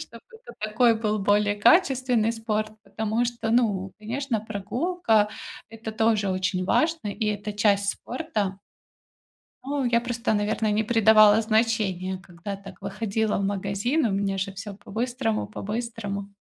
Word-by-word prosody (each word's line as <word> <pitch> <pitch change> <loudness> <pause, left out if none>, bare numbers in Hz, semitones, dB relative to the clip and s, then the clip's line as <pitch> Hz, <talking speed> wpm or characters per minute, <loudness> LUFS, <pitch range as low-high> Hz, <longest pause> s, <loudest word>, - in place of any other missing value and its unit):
чтобы - - -10
это 475 +2 -13
такой 225 +2 +3
был 215 -1 0
более 205 +1 +2
качественный 250 - +3
спорт, 215 -1 -2
потому 220 +2 -1
что, 235 -2 -3
ну, 205 -6 +1
конечно, 230 +2 -2
прогулка- 220 - 0 0.4
это 225 0 -7
тоже 220 -2 +2
очень 185 0 -1
важно, 320 - +1
и 215 +2 -3
это 210 0 -2
часть 205 -1 +2
спорта. 210 -10 -4 1.0
Ну, 280 +1 -2
я 235 -1 +3
просто, 240 -1 -1
наверное, 215 +1 0
не 215 +1 +1
придавала 220 -1 +6
значения, 215 -5 0
когда 185 +2 -8
так 195 0 -13
выходила 220 0 -1
в 200 - -1
магазин, 200 +9 0
у 220 - +1
меня 195 0 -1
же 195 +1 -3
всё 200 +1 -7
по-быстрому 225 +2 -2
по-быстрому. 210 -2 -5
215 Hz, 140 wpm, -25 LUFS, 200-235 Hz, 1.0 s, придавала